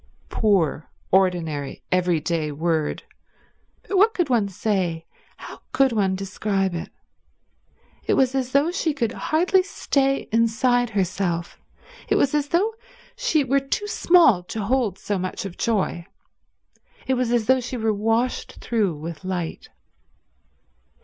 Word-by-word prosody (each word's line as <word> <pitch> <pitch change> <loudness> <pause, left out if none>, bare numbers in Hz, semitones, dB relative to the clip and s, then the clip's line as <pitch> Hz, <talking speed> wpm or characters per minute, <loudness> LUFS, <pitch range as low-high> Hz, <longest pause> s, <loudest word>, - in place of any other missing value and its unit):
Poor, 180 -8 +1 0.2
ordinary, 170 -7 0
everyday 170 -3 0
word. 160 0 -1 0.8
But 395 - 0
what 445 +3 +4
could 350 -7 0
one 230 -5 +2
say, 185 -5 -1 0.3
how - - -11
could 270 -1 +3
one 195 -4 +1
describe 195 0 -1
it? 170 - -5 1.2
It - - +3
was 260 -1 +3
as 260 -2 -1
though 285 +5 +3
she 330 -5 -1
could 235 -6 -1
hardly 360 +8 +2
stay 275 -7 0
inside 235 +2 +2
herself, 185 -4 -2 0.5
it - - +3
was 275 - +2
as 295 -1 +1
though 390 +9 +1 0.4
she 480 -12 +1
were 275 +1 +2
too 275 +9 -3
small 340 - +4
to 215 +3 -4
hold 225 -3 0
so 205 -1 -3
much 185 +2 -4
of 185 -3 -6
joy, 195 -6 -1 1.0
it 265 - +1
was 250 -2 0
as 240 -2 +2
though 260 +3 +4
she 250 +1 -5
were 220 -1 +1
washed 225 +4 -1
through 210 -8 -1
with 160 +3 -7
light. 180 -3 -4
220 Hz, 135 wpm, -23 LUFS, 180-265 Hz, 1.2 s, what